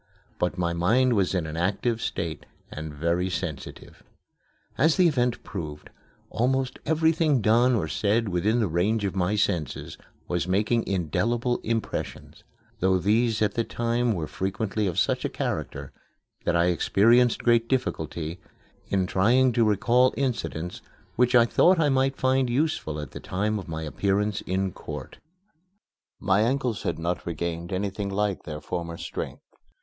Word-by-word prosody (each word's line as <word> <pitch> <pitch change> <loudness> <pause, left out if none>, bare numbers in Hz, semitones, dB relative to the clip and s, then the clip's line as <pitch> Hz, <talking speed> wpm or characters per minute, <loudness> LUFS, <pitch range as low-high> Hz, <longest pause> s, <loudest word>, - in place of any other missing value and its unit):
But 90 +1 0
my 85 -1 0
mind 120 +9 +3
was 100 -3 +1
in 90 -3 0
an 80 0 -6
active 100 +7 0
state 80 -3 -4 0.2
and 80 0 -6
very 85 +5 0
sensitive. 80 -4 -6 0.7
As 155 +1 +3
the 180 -2 +6
event 125 -6 0
proved, 75 -6 -7 0.4
almost 130 +2 0
everything 160 -2 +3
done 120 +3 +4
or 95 -8 -1
said 105 +7 +1
within 100 +6 +1
the 110 - +1
range 100 +6 0
of 95 - -2
my 95 +2 +1
senses 85 -8 -2 0.3
was 90 0 -1
making 105 +5 +1
indelible 115 - 0
impressions, 115 0 -4 0.4
though 95 0 +3
these 110 +4 +2
at 105 - +1
the 115 - 0
time 120 +1 0
were 85 -6 -3
frequently 100 +4 -2
of 85 - -3
such - - +1
a - - -1
character - - -4 0.5
that - - +1
I 85 0 +4
experienced 115 +7 +3
great 115 -1 +3
difficulty 85 - -2 0.5
in 95 -2 +1
trying 120 +8 +3
to 115 0 +3
recall 115 +4 +3
incidents 115 -10 -3 0.3
which 125 +1 +3
I 120 -1 +7
thought 175 +9 +4
I 150 -2 +3
might 135 0 +1
find 130 -1 +2
useful 120 - -1
at 75 - -7
the - - -8
time 105 +3 -1
of 95 - -9
my 80 -1 -4
appearance 100 +6 0
in 95 +1 0
court. - - -8 1.0
My 95 +2 +2
ankles 125 -1 0
had - - -2
not 85 +2 -2
regained 85 +1 -3
anything 100 +1 -2
like 100 -1 -1
their 75 -1 -6
former 85 -1 -4
strength. - - -6
105 Hz, 155 wpm, -26 LUFS, 90-120 Hz, 1.0 s, I